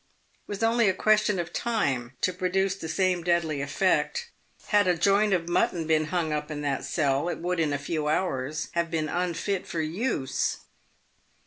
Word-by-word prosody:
It - - -39
was 205 +2 -4
only 230 -2 +4
a 190 - 0
question 210 -1 +3
of 170 -1 -4
time 135 - -1
to 185 - +1
produce 185 +1 0
the 165 -4 -7
same 180 +1 +1
deadly 165 -4 +1
effect. 195 - 0 0.4
Had 205 -2 +4
a 180 -1 +3
joint 200 +4 +3
of 175 -3 +1
mutton 175 -1 +1
been 155 -1 +2
hung 160 -1 -1
up 150 0 -3
in 150 -1 -4
that 145 -2 -1
cell, 145 +1 0
it - - -3
would 180 +1 -2
in 155 -3 +1
a 145 - 0
few 150 +1 -3
hours 150 -3 -1
have 170 0 -1
been 160 -1 -1
unfit 180 +2 -2
for 165 - -3
use. 160 - -1
170 Hz, 185 wpm, -27 LUFS, 155-190 Hz, 0.4 s, only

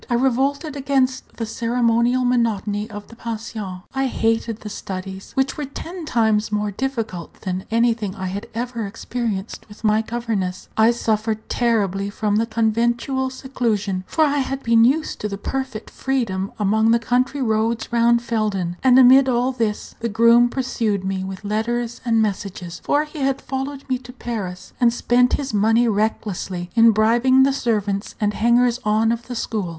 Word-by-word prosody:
I 240 - +2
revolted 270 +4 0
against 265 -2 0
the 230 - -2
ceremonial 235 +2 +1
monotony 215 -4 0
of 205 -1 -8
the 230 - -14
pension; 215 -5 -6
I 270 0 0
hated 225 -2 -1
the 210 - -6
studies, 190 -1 -7
which 270 0 0
were 295 - -3
ten 330 +5 -7
times 220 -5 +1
more 210 0 0
difficult 225 -7 -4
than 185 0 -3
anything 225 -3 +1
I 190 - -5
had 195 +2 -4
ever 235 -2 -3
experienced 225 -1 -4
with 210 +1 -14
my 215 0 +3
governess; 220 -5 -3
I 220 +1 +5
suffered 220 -2 -1
terribly 200 -5 0
from 205 0 0
the 225 +1 +1
conventual 235 +4 0
seclusion, 225 -8 -2
for 320 - +2
I 290 -1 +1
had 270 0 -3
been 230 0 +5
used 300 +6 +1
to 205 -1 -3
perfect 260 +1 -4
freedom 215 -8 -2
among 220 +2 +2
the 230 - +5
country 250 +4 0
roads 225 0 0
round 235 0 +3
Felden; 205 -7 -1
and, 255 -1 +6
amid 265 +1 +7
all 250 +1 +1
this, 225 -5 -2
the 230 - -2
groom 235 +2 +5
pursued 230 -6 -1
me 190 0 -2
with 190 +2 -7
letters 235 +3 -2
and 225 -2 +2
messages, 190 -4 -4
for 290 +1 +2
he 305 0 -9
had 270 0 0
followed 270 +1 -5
me 255 -2 0
to 250 -1 -11
Paris, 210 -8 -6
and 240 -1 +5
spent 245 +1 +2
his 275 -4 -1
money 225 +3 +3
recklessly 200 -4 -2
in 230 0 +6
bribing 235 +5 +4
the 275 0 +3
servants 210 -6 -1
and 210 -1 +1
hangers 240 +2 +3
on 215 +2 +2
of 235 0 -3
the 250 - -5
school. 215 -5 -2
230 Hz, 165 wpm, -21 LUFS, 210-250 Hz, -, amid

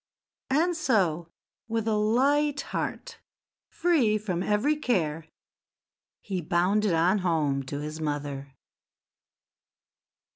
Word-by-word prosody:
And 330 +6 +2
so, 180 - +1 0.4
with 225 -1 -2
a 220 - +2
light 280 +7 +2
heart, - - -5 0.5
free 275 -12 +2
from 190 -5 -3
every 210 +10 +1
care, 165 - -1 0.9
he 190 -4 -3
bounded 185 +5 +1
on 175 +5 +3
home 155 -6 0
to 145 +1 -4
his 150 +1 -6
mother. 145 -2 -4
195 Hz, 100 wpm, -27 LUFS, 160-235 Hz, 0.9 s, on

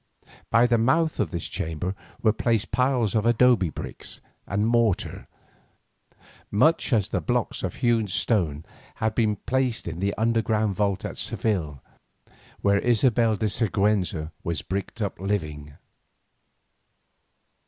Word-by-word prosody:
By 115 +1 +5
the 120 -1 +3
mouth 155 +8 +2
of 105 - +1
this 85 0 -4
chamber 80 +3 -3 0.3
were 110 -2 +4
placed 115 -1 0
piles 125 -5 +1
of 110 - +2
adobe 120 -5 +4
bricks 75 - -6 0.3
and 100 +2 0
mortar, 115 -4 +1 1.2
much 155 +10 +3
as 110 -5 +2
the - - -1
blocks - - -1
of - - -3
hewn 115 -3 +1
stone 85 -7 0 0.3
had 110 0 -1
been 110 -2 +1
placed 130 +1 -1
in 85 0 -5
that 100 +2 -1
underground 110 -2 +1
vault 100 -1 -1
at - - -6
Seville 80 - -2 0.8
where 100 0 +3
Isabella 115 -2 +3
de 110 - -1
Siguenza 100 -7 0
was 85 -2 -3
bricked 100 +3 -4
up 100 - -4
living. 75 -7 -3
105 Hz, 130 wpm, -25 LUFS, 95-115 Hz, 1.2 s, By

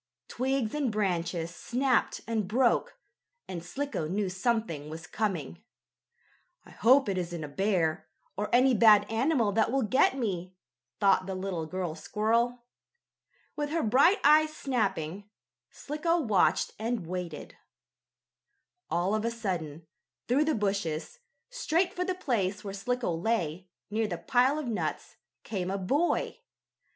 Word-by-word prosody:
Twigs 260 -2 -1
and 290 -5 0
branches 175 -5 -1
snapped 255 +6 0
and 220 -4 -1
broke, 245 - +1 0.5
and 175 -3 -6
Slicko 270 - -3
knew 195 +3 -1
something 190 - -1
was 160 +1 -8
coming. 180 - -3 1.0
"I - - -15
hope 255 +4 +4
it 190 -2 0
isn't 170 -2 -4
a - - -4
bear, 170 0 0 0.3
or 210 +2 -2
any 255 +2 +5
bad 215 -2 +6
animal 235 -1 +2
that 220 +2 +2
will 270 0 +1
get 260 +4 +3
me," 185 -6 -3 0.4
thought 195 -1 +3
the 190 - -3
little 185 -4 -3
girl 180 -1 -3
squirrel. 230 +8 0 0.9
With 295 0 -2
her 330 +1 0
bright 275 - +5
eyes 310 +2 +6
snapping, 205 - -2 0.4
Slicko 330 +4 -1
watched 215 - +2
and 225 -4 -2
waited. 175 -2 -6 1.3
All 180 +4 0
of 215 0 0
a 230 - +1
sudden, 175 -9 -4 0.4
through 275 +5 +3
the 310 -1 +1
bushes, 195 - -2 0.3
straight 360 -7 0
for 360 - -1
the 370 0 -2
place 210 - -1
where 200 -2 -5
Slicko 240 -1 -2
lay, 180 -2 -1 0.2
near 220 +1 0
the 175 -4 -4
pile 255 - +2
of 305 - -3
nuts, 230 -3 -3 0.3
came 185 -4 -3
a 195 - -1
boy. 280 - 0
215 Hz, 140 wpm, -29 LUFS, 180-255 Hz, 1.3 s, bad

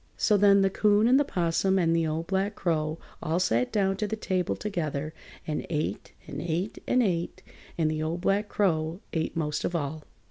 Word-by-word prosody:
So 210 - +3
then 200 -1 +5
the 195 - +2
'Coon 210 +2 +3
and 260 +3 +5
the - - +4
'Possum 190 -4 +1
and 165 -2 +2
the 165 -1 +1
Old 160 +2 -2
Black 195 +3 -1
Crow 155 -2 -1 0.2
all 160 +3 0
sat 125 -9 +1
down 195 -3 +1
to 210 - -1
the 220 - -2
table 185 -4 -1
together 155 -7 -3 0.3
and 150 -1 -2
ate 150 -2 -3
and 145 +1 -6
ate 175 +5 -2
and 250 0 +3
ate, 175 -5 -2 0.3
and 155 -2 +2
the 155 0 -2
Old 165 +3 -2
Black 200 +2 +1
Crow 165 -2 0
ate 160 0 -2
most 150 -2 -1
of 175 - -1
all. 155 -1 -3
175 Hz, 200 wpm, -27 LUFS, 155-200 Hz, 0.3 s, then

